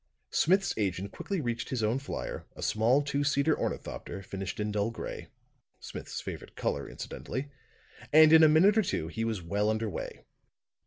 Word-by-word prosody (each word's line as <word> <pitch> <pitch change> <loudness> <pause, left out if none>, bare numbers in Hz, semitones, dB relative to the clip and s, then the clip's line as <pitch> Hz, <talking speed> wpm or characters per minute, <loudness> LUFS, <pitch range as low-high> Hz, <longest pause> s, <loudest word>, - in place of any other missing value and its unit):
Smith's 190 +3 +3
agent 95 -1 -1
quickly 195 -2 -3
reached 120 -3 -3
his 125 -4 -1
own 110 +5 +1
flier, 135 - -5
a - - -7
small 120 +6 +3
two 140 0 -1
seater 145 +2 +2
ornithopter 100 - -4
finished 95 +1 -5
in 105 0 -1
dull 105 +1 0
gray 115 - -6 0.5
Smith's - - -6
favorite - - -7
color, 70 -1 -2
incidentally 140 +2 -6 0.6
and 155 +1 +8
in 160 - +9
a 155 - +8
minute 180 +7 +6
or 220 - +5
two 80 - -2
he 115 +6 -3
was 110 -5 -2
well 100 +5 0
under 110 +1 0
way. 105 - -6
115 Hz, 170 wpm, -30 LUFS, 105-150 Hz, 0.6 s, in